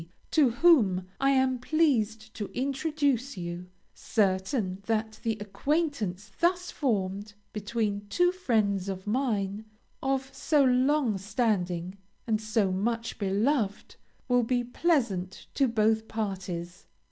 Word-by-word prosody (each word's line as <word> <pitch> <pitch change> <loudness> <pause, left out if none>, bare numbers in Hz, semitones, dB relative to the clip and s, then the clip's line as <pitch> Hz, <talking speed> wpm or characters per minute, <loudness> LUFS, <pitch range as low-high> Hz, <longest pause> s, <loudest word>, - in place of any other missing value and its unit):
to 295 -5 +5
whom 230 - +4
I 275 - +3
am 260 -2 +2
pleased 225 -7 +1
to 205 - -4
introduce 275 -2 0
you, 175 0 -5 0.3
certain 190 -1 0
that 220 -1 -1
the 225 -2 -1
acquaintance 210 - -2
thus 355 +1 +1
formed, 205 -5 -2 0.2
between 210 -1 -2
two 355 +6 +3
friends 210 - 0
of 190 -1 -5
mine, 210 -3 -1 0.4
of 270 0 -1
so 300 -3 +2
long 255 -3 +2
standing 190 -4 -1 0.3
and 220 -2 0
so 215 -3 +1
much 230 +5 -2
beloved, 210 +2 0 0.3
will 245 -1 +4
be 245 +1 0
pleasant 235 - 0
to 275 - +3
both 220 -1 +2
parties. 185 -5 -4
220 Hz, 115 wpm, -28 LUFS, 200-265 Hz, 0.4 s, to